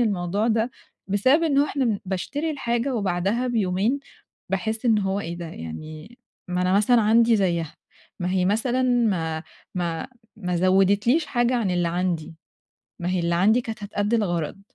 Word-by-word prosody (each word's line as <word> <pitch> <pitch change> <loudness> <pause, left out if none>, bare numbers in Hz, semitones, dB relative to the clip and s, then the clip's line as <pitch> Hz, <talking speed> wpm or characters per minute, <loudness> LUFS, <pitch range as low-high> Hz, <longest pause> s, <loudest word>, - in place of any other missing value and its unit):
الموضوع 205 0 0
ده 225 +2 +1 0.4
بسبب 260 - +3
إن 280 -4 +2
هو 285 - +5
إحنا 245 -9 0
باشتري 280 - -3
الحاجة 245 -2 -1
وبعدها 200 +3 0
بيومين 220 +3 0 0.5
باحس 220 +5 -2
إن 225 -3 +4
هو 195 0 -1
إيه 170 -2 -5
ده؟! 170 -1 -6
يعني 155 - -9 0.3
ما 180 0 0
أنا 185 - +1
مثلًا 210 +5 +4
عندي 230 +1 +4
زيها، 170 -5 0 0.5
ما 180 +1 -1
هي 185 -1 +1
مثلًا 235 +6 +1
ما 195 -11 +1 0.3
ما 170 +2 -2 0.3
ما 180 -4 -2
زودت 195 +3 +3
ليش 300 +6 +3
حاجة 240 0 +1
عن 210 -6 0
اللي 175 -1 +1
عندي، 170 -2 -2 0.7
ما 175 +1 -2
هي 185 - 0
اللي 170 0 0
عندي 215 +8 +4
كانت 220 -3 -7
هتأدي 205 +2 0
الغرض. 175 -3 -1
200 Hz, 165 wpm, -24 LUFS, 180-235 Hz, 0.7 s, هو